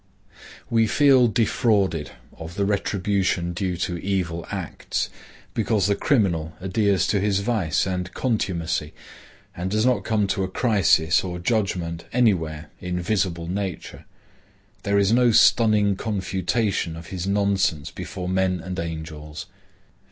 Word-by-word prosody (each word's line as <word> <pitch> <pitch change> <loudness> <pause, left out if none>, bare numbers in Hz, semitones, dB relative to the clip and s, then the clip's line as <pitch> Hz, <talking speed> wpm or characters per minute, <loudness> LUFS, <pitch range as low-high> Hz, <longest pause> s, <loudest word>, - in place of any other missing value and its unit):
We 115 -3 +2
feel 135 -1 +5
defrauded 105 - +1 0.3
of 80 +1 -9
the 100 - 0
retribution 95 -3 0
due 90 0 -2
to 90 0 -2
evil 90 -4 -2
acts, - - -3 0.4
because 105 -3 +1
the 100 - +3
criminal 90 - +1
adheres 95 +1 +1
to 100 - +1
his 100 0 +1
vice 100 -8 0
and 90 -1 -3
contumacy 85 - -1 0.6
and 90 +2 -3
does 110 +3 +1
not 125 -1 +2
come 110 -2 +1
to 95 - 0
a - - -1
crisis 95 -6 +3
or 90 -2 -4
judgment 90 -4 -1
anywhere 80 -10 +1
in 90 0 -3
visible 90 -3 -1
nature. 95 0 -5 0.8
There 100 0 +1
is 100 0 +3
no 120 +1 +4
stunning 105 -3 +4
confutation 95 -2 -1
of 85 +1 -10
his 95 -1 -4
nonsense 100 -6 +1
before 90 -2 -6
men 95 0 +1
and 90 +1 -5
angels. 80 0 -6
95 Hz, 130 wpm, -23 LUFS, 85-105 Hz, 0.8 s, feel